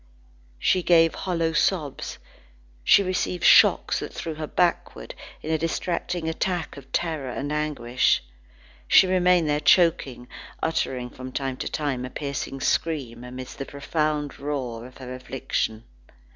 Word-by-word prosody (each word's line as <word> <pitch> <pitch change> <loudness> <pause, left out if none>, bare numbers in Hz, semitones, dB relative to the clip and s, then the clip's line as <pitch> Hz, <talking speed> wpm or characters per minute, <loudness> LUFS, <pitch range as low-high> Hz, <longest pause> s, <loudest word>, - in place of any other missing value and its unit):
She 185 - +2
gave 165 -2 +5
hollow 165 -3 -1
sobs, 155 -4 0 0.7
she 200 - +6
received 180 -1 -2
shocks - - +6
that - - -6
threw 165 - -5
her 155 0 -5
backward, 175 +1 -1 0.3
in 155 - -3
a 160 - +1
distracting 170 +1 -2
attack 175 +1 -2
of 135 -2 -13
terror 155 -6 -1
and 140 +4 -4
anguish. 135 - +1 0.6
She - - +7
remained 180 -2 +3
there 150 0 +1
choking, 150 -7 +3 0.4
uttering 130 -6 -1
from 130 0 -8
time 135 -1 -3
to - - -4
time 140 -5 -2
a 125 - -5
piercing 140 -1 -5
scream 130 -9 -1
amidst 125 +1 -8
the 135 - -3
profound 150 0 -2
roar 130 -5 -4
of 130 - -16
her 130 -1 -7
affliction. 125 -3 -3
150 Hz, 140 wpm, -25 LUFS, 130-165 Hz, 0.7 s, She